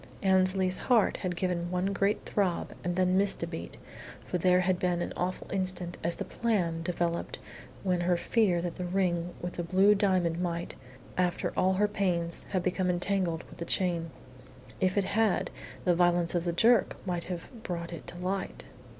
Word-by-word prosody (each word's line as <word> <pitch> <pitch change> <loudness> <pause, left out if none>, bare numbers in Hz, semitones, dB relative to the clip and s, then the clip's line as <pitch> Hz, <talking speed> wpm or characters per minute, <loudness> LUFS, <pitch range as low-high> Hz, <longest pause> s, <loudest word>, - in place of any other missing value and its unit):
Annesley's 185 -1 +3
heart 235 -5 +4
had 180 -2 -3
given 175 -1 -1
one 185 +2 0
great 200 +1 0
throb 190 -4 -1
and 175 0 -1
then 185 0 +3
missed 200 -3 +2
a - - +1
beat, 165 -1 -7 0.5
for 180 - -2
there 180 +1 +4
had 180 0 +1
been 180 -1 +1
an - - -3
awful 180 +1 -2
instant 185 -2 -2
as 170 +1 +1
the - - -4
"plan" 180 -8 0
developed 170 0 -2 0.5
when 180 -2 +1
she 175 -1 +3
feared 190 -7 +2
that 175 -1 -4
the 180 - -3
ring 175 -2 0
with 175 0 -4
the 175 - -1
blue 190 +4 +5
diamond 185 -5 +1
might, 170 -1 -2 0.5
after 180 -1 0
all 185 +1 +3
her 205 +2 +3
pains, 175 -5 -1
have 185 -3 0
become 185 0 0
entangled 180 -2 0
with - - -15
the - - -2
chain. 170 -2 0 0.7
If 185 +1 +1
it 200 - +4
had, 215 +1 +1 0.3
the 180 - +4
violence 175 0 +3
of 175 -1 0
the 170 - +1
jerk 225 +3 +4
might 175 -2 -2
have 175 -2 -6
brought 170 -3 -4
it 170 - -9
to 175 - -8
light. 185 +2 -3
180 Hz, 185 wpm, -29 LUFS, 175-190 Hz, 0.7 s, blue